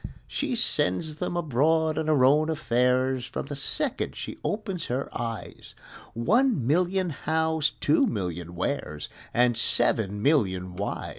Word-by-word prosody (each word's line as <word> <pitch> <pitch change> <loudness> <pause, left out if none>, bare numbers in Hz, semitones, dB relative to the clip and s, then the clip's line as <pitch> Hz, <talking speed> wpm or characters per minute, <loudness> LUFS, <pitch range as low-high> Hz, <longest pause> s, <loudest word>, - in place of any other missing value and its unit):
She - - -3
sends 150 - +1
'em 175 - -2
abroad 160 +1 +1
on 160 0 -2
her 145 -5 +4
own 150 +4 +3
affairs, 130 -3 0
From - - -5
the 145 +1 -6
second 140 - -2
she - - -7
opens 205 -5 -3
her 130 +3 -4
eyes 115 -2 -6 0.4
One 215 - +2
million 180 +5 +1
Hows, 160 0 0
two 150 - +3
million 90 -4 -4
Wheres, 85 - -3 0.2
And 120 0 +2
seven 105 -2 +4
million 95 - +1
Whys! 100 +2 -4
140 Hz, 135 wpm, -26 LUFS, 115-160 Hz, 0.4 s, her